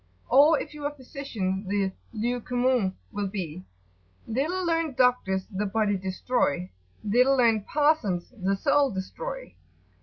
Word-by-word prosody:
Or 290 +4 +6
if - - -7
you 295 -1 -7
are 290 - 0
a - - -17
physician 225 -8 -4
the 200 -1 0 0.2
"lieu 240 +2 -2
commun" 245 -6 +1 0.2
will 205 -1 -2
be, 185 -3 -5 0.6
"Little 315 +11 -1
learn'd 330 -4 0
doctors 245 -7 +2
the 205 +1 -1
body 210 0 +1
destroy: 185 - -1 0.3
Little 250 +6 +4
learn'd 225 -4 +3
parsons 290 - +1
the 195 -2 0
soul 280 +6 +3
destroy." - - -6
235 Hz, 140 wpm, -27 LUFS, 195-280 Hz, 0.6 s, Or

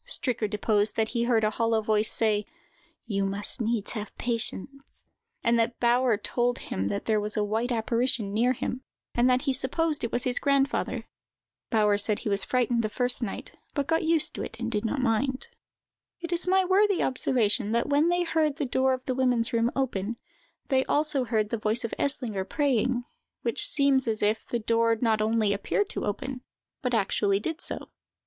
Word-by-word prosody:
Stricker 250 - -1
deposed 210 0 +1
that 220 -1 0
he 235 0 -1
heard 230 -2 +2
a 215 - +2
hollow 225 0 +1
voice 215 0 0
say: 210 -2 +1 0.6
"You 200 -4 -1
must 200 +4 -1
needs 225 -2 -1
have 210 -3 -6
patience;" 245 +3 -3 0.4
and 235 0 +3
that 230 +1 0
Bauer 240 -1 +3
told 240 +3 -1
him 95 +1 -3
that 100 0 -3
there 215 -1 +2
was 210 +1 -3
a 210 - +2
white 220 +4 -1
apparition 230 -2 0
near 240 +4 +2
him, 255 +1 -4 0.3
and 245 +1 +3
that 255 +1 +2
he 275 -3 +1
supposed 295 +4 0
it 235 - -2
was 240 - -1
his 250 -1 +2
grandfather. 275 -1 0 0.6
Bauer 210 -3 +3
said 210 0 +1
that - - -8
he - - -2
was 200 -1 +3
frightened 245 -2 +1
the 215 - -1
first 245 +3 +2
night, 220 -5 -5 0.2
but 285 -2 0
got 325 +2 +1
used 325 -1 +3
to - - -6
it - - -7
and 235 -1 -3
did 210 -1 -1
not 260 +3 -1
mind. 260 - 0 0.7
It 340 0 -6
is 345 +1 +1
worthy 380 +1 +3
of - - +2
observation, 240 -4 +1
that 235 +4 +1
when 290 +4 +3
they 350 0 +2
heard 315 -3 +1
the 290 - -2
door 260 +1 +1
of 255 0 -5
the 260 - -1
women's 250 -2 +1
room 230 0 +2
open, 235 -4 -2 0.5
they 265 -2 +3
also 295 -3 +1
heard 220 -3 0
the 230 - -2
voice 215 +3 -1
of 230 - -4
Eslinger 235 -8 0
praying, 255 -4 +1 0.4
which 235 - +1
seems 275 -3 +3
as 220 -2 -1
if 215 +2 +1
the 240 - -1
door 230 0 +1
not 220 -3 +1
only 215 -1 +2
appeared 375 - -1
to - - -4
open, 250 +5 -4 0.4
but 250 -2 0
actually 200 -1 +1
did 325 - -4
so. - - -3
235 Hz, 195 wpm, -27 LUFS, 215-265 Hz, 0.7 s, and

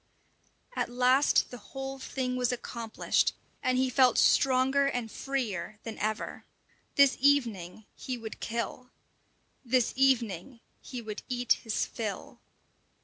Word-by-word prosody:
At - - -1
last 255 +3 +3
the 245 - -8
whole 270 +4 -7
thing 255 -1 -3
was 250 -1 +1
accomplished, 235 -2 -1 0.3
and 255 0 +1
he 260 0 +3
felt 255 -1 +4
stronger 265 +1 +4
and 245 -5 -2
freer 215 -9 -3
than 225 -1 -7
ever. 215 0 -3 0.5
This 280 -2 +6
evening 225 -9 +1
he 255 -2 -5
would 225 -2 -8
kill! 235 +2 -4 0.7
This 250 -1 +2
evening 245 -4 +1 0.2
he 250 -3 -7
would 215 -1 -6
eat 245 -1 +2
his 225 -3 -1
fill! 215 -3 -6
250 Hz, 125 wpm, -29 LUFS, 225-265 Hz, 0.7 s, This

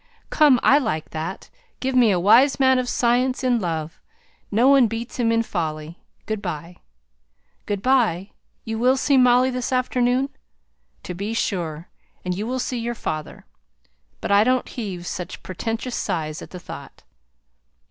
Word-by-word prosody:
"Come, 290 -5 +5
I 280 - +6
like 155 - -3
that. 160 +4 -6 0.3
Give 265 0 -2
me 250 -3 +5
a 185 -3 +2
wise 235 +11 +5
man 260 -1 +4
of 250 -1 -2
science 250 +2 +1
in 245 -2 +2
love! 165 -4 -4 0.5
No 230 +5 +3
one 275 -3 +6
beats 225 +2 -6
him 230 -1 +2
in 230 0 +2
folly. 160 -4 -4 0.3
Good 215 -2 -3
by." 175 -2 -6 0.9
"Good 205 -1 -3
by. 220 -8 +2 0.3
You 225 0 -3
will 255 +3 +3
see 280 +1 +2
Molly 250 0 +5
this 250 0 -3
afternoon!" 255 +1 +1 0.7
"To 180 - -5
be 200 +5 -4
sure. 170 -7 -2 0.4
And 180 0 -1
you 210 +4 -4
will 255 +2 -2
see 250 -1 -2
your 235 +1 -3
father. 155 -7 -5 0.8
But - - -3
I 200 +1 +6
don't 255 +2 +1
heave 190 -7 -6
such 180 0 -6
portentous 225 +6 -4
sighs 155 -2 -3
at - - -10
the 180 - -9
thought." - - -11
225 Hz, 160 wpm, -22 LUFS, 180-255 Hz, 0.9 s, I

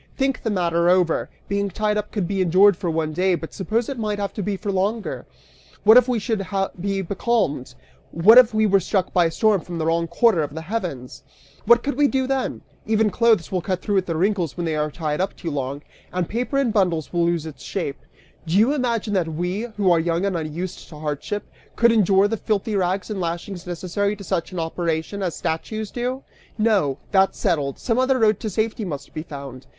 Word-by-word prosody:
Think 270 -1 0
the 225 - -2
matter 170 -3 +1
over! 180 -2 +2 0.2
Being 200 0 -1
tied 210 +3 -1
up 210 0 -3
could 200 -5 -2
be 195 0 -1
endured 185 +3 +5
for 175 -1 -3
one 160 -1 -1
day, 185 +2 +2
but 165 -1 -8
suppose 220 +4 -1
it 275 -4 -5
might 210 -2 -1
have 200 -1 -3
to 210 - -4
be 200 0 -2
for 205 +1 -3
longer? 200 +4 -2 0.6
What 220 +2 +8
if 250 0 +7
we 250 -2 +1
should 215 -2 -1 0.4
be 195 +1 -1
becalmed? 175 - -1 0.3
What 210 +9 +7
if 250 -3 +5
we 220 0 +2
were 195 -1 +4
struck 190 0 -1
by 175 -1 +4
a 165 - 0
storm 210 +1 +2
from 175 0 -7
the 160 - -1
wrong 165 +1 +1
quarter 175 +1 +3
of 145 0 -4
the 160 - -4
heavens? 165 - -5 0.5
What 235 +1 +6
could 285 -2 -2
we 290 -1 +5
do 265 -1 0
then? 265 0 -2 0.3
Even 220 -1 +2
clothes 225 -4 +2
will 185 -2 0
cut 185 0 -3
through 205 -3 +2
at 185 - -6
the 165 - -2
wrinkles 180 -4 0
when 175 - -2
they 160 -1 -1
are 150 0 0
tied 150 0 -2
up 195 - -2
too 170 -2 -5
long, 140 +1 -4 0.3
and 180 -2 -1
paper 245 +5 -2
in 270 -4 +2
bundles 180 -7 0
will 170 -1 +2
lose 170 -2 0
its 155 -2 -9
shape. 165 -8 -4 0.5
Do 165 +4 +1
you 230 +7 +4
imagine 235 -6 -1
that 180 -4 +1
we, 180 +7 -2
who 195 -3 +3
are 170 - +4
young 170 +3 0
and 195 -2 -1
unused 165 +3 -5
to 155 - -11
hardship, 150 +7 -4 0.3
could 235 0 +5
endure 200 -2 +4
the 225 +2 -2
filthy 215 +1 -1
rags 190 +2 -1
and 200 -3 -3
lashings 175 +2 -4
necessary 185 +4 -2
to 200 - -10
such 180 -2 -2
an 185 - -7
operation, 165 +3 -2
as 180 -4 -2
statues 210 +6 -3
do? 255 +2 -3 0.3
No! 205 - +2
That's 195 -1 +3
settled! 145 -7 0
Some 235 0 0
other 260 0 +3
road 215 -4 +3
to 220 - -3
safety 220 +2 -1
must 150 -8 -6
be 155 - -4
found! 140 -4 -9
190 Hz, 220 wpm, -22 LUFS, 165-215 Hz, 0.6 s, What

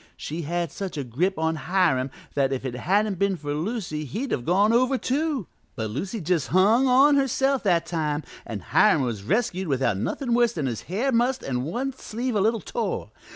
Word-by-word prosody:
She 160 +3 -5
had 170 0 -2
such 195 -5 -5
a 145 - -2
grip 155 +11 -1
on 160 0 0
Hiram 160 -4 +1 0.2
that 135 -1 +1
if 135 0 -3
it 130 - -3
hadn't 195 - 0
been 200 -2 +1
for 145 -2 -4
Lucy 165 -2 -3
he'd 230 - -4
have 120 - -1
gone 200 +6 +3
over, 255 +3 +3
too, 280 - -1 0.3
but 110 -4 -3
Lucy 190 - -4
just 170 -4 0
hung 210 - +4
on 275 +3 +6
herself 270 0 +1
that 170 -3 +3
time, 155 -3 -2 0.2
an' - - -6
Hiram 135 - +4
was 115 -5 -3
rescued 190 - 0
without 130 -7 +1
nothin' 240 - -2
worse 240 -1 +3
than 155 -9 -2
his 120 -4 -3
hair 230 +9 0
mussed 250 +2 +1
an' 125 -2 -2
one 255 - -2
sleeve 250 0 -4
a 205 - +2
little 220 +1 +1
tore. 205 - -3
185 Hz, 200 wpm, -25 LUFS, 145-235 Hz, 0.3 s, on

